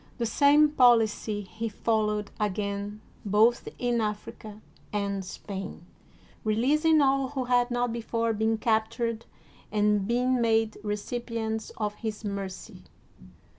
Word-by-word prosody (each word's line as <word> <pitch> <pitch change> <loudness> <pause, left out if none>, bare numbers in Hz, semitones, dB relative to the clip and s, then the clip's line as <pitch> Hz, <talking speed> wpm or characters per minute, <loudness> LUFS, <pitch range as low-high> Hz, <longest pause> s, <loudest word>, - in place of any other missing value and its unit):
The 235 - -1
same 290 +6 +5
policy 230 -6 +3
he 220 +3 -5
fol 220 0 0
lowed 210 -1 -3
again 205 0 -2 0.2
both 220 +4 +3
in 240 -1 0
Africa 210 0 -5 0.3
and 200 -1 -2
Spain, 190 -2 -7 0.6
releasing 295 +9 +3
all 270 -1 +3
who 265 -1 -3
had 245 0 +2
not 245 -1 0
before 230 0 -1
been 220 +1 +1
captured 225 +1 -1 0.4
and 210 -1 +2
been 250 +1 +1
made 225 -1 +1
recipients 220 +1 -3
of 210 -2 -1
his 215 -1 -4
mercy. 200 -2 -6
220 Hz, 120 wpm, -27 LUFS, 210-240 Hz, 0.6 s, same